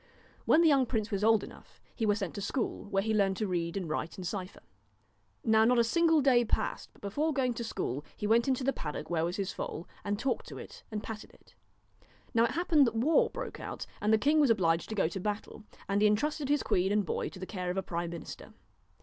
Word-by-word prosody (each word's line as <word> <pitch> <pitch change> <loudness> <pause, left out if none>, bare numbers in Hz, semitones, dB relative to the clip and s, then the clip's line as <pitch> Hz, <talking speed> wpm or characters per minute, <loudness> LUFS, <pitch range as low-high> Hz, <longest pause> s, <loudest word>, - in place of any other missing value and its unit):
When 335 - +5
the - - +6
young 275 -4 +4
prince 220 -3 -2
was 200 0 -1
old 220 -1 +4
enough, - - -13 0.2
he 225 - 0
was 205 0 +3
sent 195 -5 -3
to 200 - -5
school, 240 +2 -2
where 195 -1 0
he 220 +1 0
learned 195 -3 +2
to 215 - -1
read 170 -2 -2
and 185 -3 -3
write 155 +1 -3
and 185 - -6
cypher. 185 +1 -5 0.8
Now 220 0 +4
not 245 +2 +4
a 235 - +5
single 325 +6 +3
day 255 -3 +5
passed 225 - -1
but - - -24
before 290 +11 0
going 260 -3 +1
to 235 - -4
school 145 - -3
he - - -4
went 230 +3 +3
into 260 -1 +1
the 275 +1 +1
paddock 150 +2 -5
where 165 -2 +1
was 175 +2 -1
his 195 -1 -3
foal, 165 - -5 0.2
and 205 0 -1
talked 260 +3 -2
to - - -8
it - - -10
and 215 -1 -4
patted 220 -2 -8
it. - - -24 0.8
Now 230 0 +4
it - - -1
happened 320 -6 +4
that 230 - -2
war 280 +8 +3
broke - - -6
out, - - -6 0.2
and 210 - +2
the 220 - +6
king 295 +7 +3
was 290 -4 +5
obliged 170 -7 +2
to 220 - -3
go 195 - +2
to 185 +4 -5
battle, 210 +2 -4 0.2
and 200 +1 +1
he 210 - +6
intrusted 280 +7 0
his 290 -1 +2
queen 190 +2 +1
and 205 -1 +2
boy - - -2
to - - -12
the 185 - -5
care 185 -3 -4
of 180 - -2
a 190 - 0
prime 170 -1 -3
minister. 170 -1 -9
215 Hz, 245 wpm, -31 LUFS, 190-250 Hz, 0.8 s, the